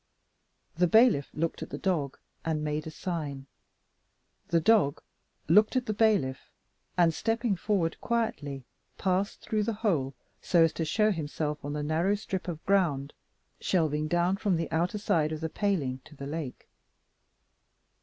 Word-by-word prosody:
The 180 +1 +4
bailiff 220 - +5
looked 165 +1 -2
at - - -5
the - - -5
dog, 160 -8 -1 0.3
and 155 -2 -1
made 150 +1 -2
a - - -3
sign. 155 -5 -4 1.0
The 170 - +3
dog 190 -6 +3 0.4
looked 210 - +5
at 255 -1 +1
the 215 - -1
bailiff; 205 -12 +1 0.5
and, 170 -2 +4
stepping 225 +2 0
forward 180 -3 -1
quietly, 145 - -2 0.3
passed 190 +2 0
through 215 -2 -1
the 225 +2 0
hole, 140 -9 +1 0.3
so 170 -2 +4
as 165 - +2
to 165 - -2
show 210 +7 +2
himself 150 -3 -3
on 145 +1 -4
the 150 0 -2
narrow 165 +7 +1
strip 195 -3 -4
of 165 -3 -5
ground 155 -8 +1 0.5
shelving 155 -4 +1
down 175 +4 +1
from 200 -2 +1
the 165 - -3
outer 175 +5 0
side 160 -7 +1
of 155 - -3
the 160 - -2
paling 155 -11 -1
to 150 - -15
the 140 - -7
lake. 145 -2 -5
165 Hz, 155 wpm, -29 LUFS, 150-200 Hz, 1.0 s, bailiff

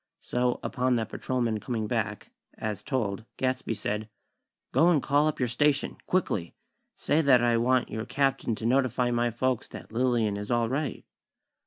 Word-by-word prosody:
So, 125 0 0
upon 125 0 +1
that 110 -2 -1
patrolman 120 -4 -1
coming 110 0 -3
back, 105 -2 -2 0.3
as 105 -3 -3
told, 110 -6 -2
Gadsby 130 -3 -1
said: 105 +1 -3 0.6
"Go 170 - +5
and 165 -4 +4
call 145 +3 +2
up 155 - -1
your 125 - +1
station, 145 +4 +1
quickly! 105 - 0 0.4
Say 155 +2 +2
that 130 -5 +5
I 120 -1 +3
want 125 +2 +2
your 110 +1 -3
Captain 135 -5 0
to 110 - -6
notify 125 0 +2
my 120 0 +1
folks 125 +1 -1
that - - -10
Lillian 115 -3 +1
is 105 0 -6
all 120 -1 +2
right." 140 +2 -2
120 Hz, 165 wpm, -28 LUFS, 110-130 Hz, 0.6 s, Go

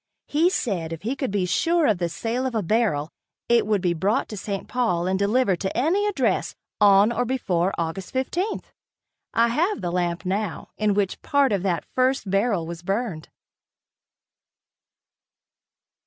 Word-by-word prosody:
He 320 +4 +3
said 185 - -2
if 165 +1 -6
he 240 +6 -1
could 265 -1 -2
be 195 -2 0
sure 330 - +2
of 210 -8 +2
the 175 -1 0
sale 235 +9 -2
of 250 - -4
a 215 - 0
barrel, 170 -7 +1 0.4
it 235 -3 +3
would 210 -3 +1
be 175 -2 +1
brought 190 +6 0
to 215 - -6
St. 200 -1 -4
Paul 225 -9 0
and 190 +1 0
delivered 200 -2 +2
to 190 - -3
any 355 +11 +2
address 410 - 0 0.2
on 205 +1 +6
or 235 +1 0
before 195 -8 0
Aug. 165 +3 -2
15. 340 - -2 0.7
I 230 +1 +4
have 345 - 0
the 175 - -2
lamp 175 +1 -1
now, 195 0 -2
in 210 -2 +1
which 200 -2 -1
part 280 -3 +2
of 200 -3 +1
that 180 -3 -1
first 255 -3 +1
barrel 195 -3 +1
was 170 0 -7
burned. 195 -3 -3
205 Hz, 165 wpm, -24 LUFS, 180-250 Hz, 0.7 s, on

